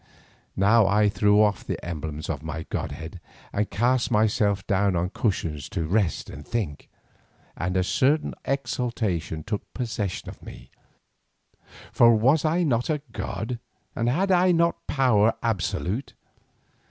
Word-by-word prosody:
Now 100 +2 +4
I 105 +1 +3
threw 105 0 +3
off 105 -3 +1
the - - -3
emblems 75 -3 -5
of - - -3
my 80 0 -5
godhead 85 +3 -5 0.3
and 105 +1 0
cast 120 +7 +1
myself 105 -3 +2
down 100 -2 +1
on 90 +2 -1
cushions 80 - -2
to 90 -6 -2
rest 95 -1 0
and 70 - -9
think, 100 -8 -4 0.7
and 90 +2 -2
a 90 - +3
certain 140 +10 +1
exultation 110 - -2
took 105 - -5
possession 110 -6 -3
of - - -9
me, - - -12 1.2
for 115 -1 +6
was 135 +8 +3
I 165 +3 +2
not 125 -5 0
a 150 -2 -1
god, 110 +5 -4 0.4
and 115 +1 0
had 190 +9 +1
I 180 0 +5
not 170 0 +1
power 130 -6 +3
almost 110 +2 +3
absolute? 105 +2 -2
105 Hz, 140 wpm, -25 LUFS, 90-125 Hz, 1.2 s, for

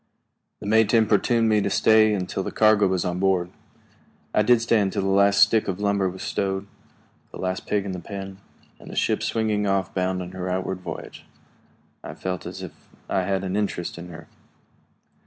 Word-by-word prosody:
The - - -8
mate 110 +1 +3
importuned 115 +1 +3
me 105 -1 +3
to 100 - 0
stay 110 +1 +4
until 95 0 -3
the - - -4
cargo 110 -2 +4
was 95 -1 -1
on 90 0 -2
board. 95 -2 +1 0.8
I - - +4
did 120 +2 +4
stay 115 -1 +2
until 95 -1 0
the - - -1
last 100 +1 +4
stick 105 +2 +4
of 95 -1 -3
lumber 100 -2 +1
was 95 +1 -8
stowed, 95 0 -2 0.6
the - - -10
last 95 0 -3
pig 100 -1 0
in 100 - -3
the 90 - -5
pen, 95 +1 -8 0.4
and - - -13
the - - -8
ship - - +1
swinging 110 -2 0
off, 95 -1 0
bound 95 0 -1
on 90 - -9
her 95 0 -5
outward 95 0 -2
voyage. 90 - -8 0.8
I - - -8
felt 90 -2 -4
as - - -7
if - - -7 0.4
I 95 - +1
had 95 0 -1
an 95 0 -3
interest 100 -5 -2
in 85 - -8
her. 80 -1 -11
95 Hz, 195 wpm, -24 LUFS, 95-105 Hz, 0.8 s, stay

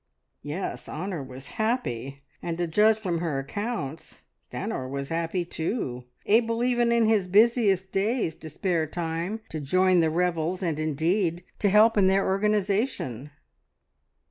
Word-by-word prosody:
Yes, 150 +6 -5
Honor 175 0 -4
was 130 0 -9 0.2
happy; 140 - -2 0.2
and 170 -1 -3
to 175 - 0
judge 210 +6 +4
from 180 -6 -2
her 165 -5 -1
accounts 160 - -5 0.3
Stanor 130 -1 -4
was 140 0 -4
happy 170 +2 -1
too, 160 - -3 0.2
able 230 +2 +2
even 240 -1 +2
in 235 -1 +4
his 210 -4 +2
busiest 200 -2 +3
days 210 -2 0
to 160 - -9
spare 165 0 -1
time 170 +6 -3
to 155 - -4
join 185 +5 +3
the 160 -1 +3
revels, 175 +2 0
and, 160 -4 -1
indeed, 165 +4 0 0.2
to 205 - +3
help 215 +2 +5
in 190 - +5
their 195 +1 +3
organisation. 195 - 0
180 Hz, 145 wpm, -26 LUFS, 155-210 Hz, 0.3 s, help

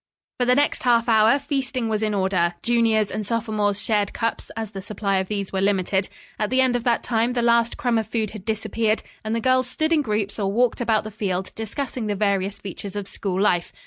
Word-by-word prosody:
For 245 - +2
the 250 - +5
next 290 +1 +1
half 235 -2 +3
hour 220 +3 +5
feasting 270 -4 -2
was 215 -1 -1
in 215 -1 0
order. 185 -3 +1
Juniors 225 -3 +2
and 215 - -3
sophomores 210 -2 -1
shared 205 -1 0
cups; 230 0 -2
as 220 -2 -4
the 195 -2 -6
supply 200 0 -1
of 190 0 -1
these 200 -2 -3
were 190 - 0
limited. 195 -1 +1 0.3
At 210 - 0
the 255 - +2
end 260 -2 +3
of 240 - -1
that 235 -2 +2
time 235 0 +1
the 240 -1 0
last 235 0 +3
crumb 240 -3 +1
of 220 - -3
food 220 -2 -2
had 215 -3 -9
disappeared 220 +1 -1 0.2
and 220 +1 -1
the - - 0
girls 255 +1 +2
stood 315 +5 0
in 310 - +4
groups 210 -4 -2
or 195 -1 0
walked 240 +3 +1
about 225 -2 +2
the 215 - -7
field, 190 -3 -3
discussing 230 +1 -4
the 205 - -1
various 200 -1 0
features 200 0 -8
of 205 -1 -3
school 190 -2 -3
life. 175 -4 +2
220 Hz, 225 wpm, -23 LUFS, 200-235 Hz, 0.3 s, the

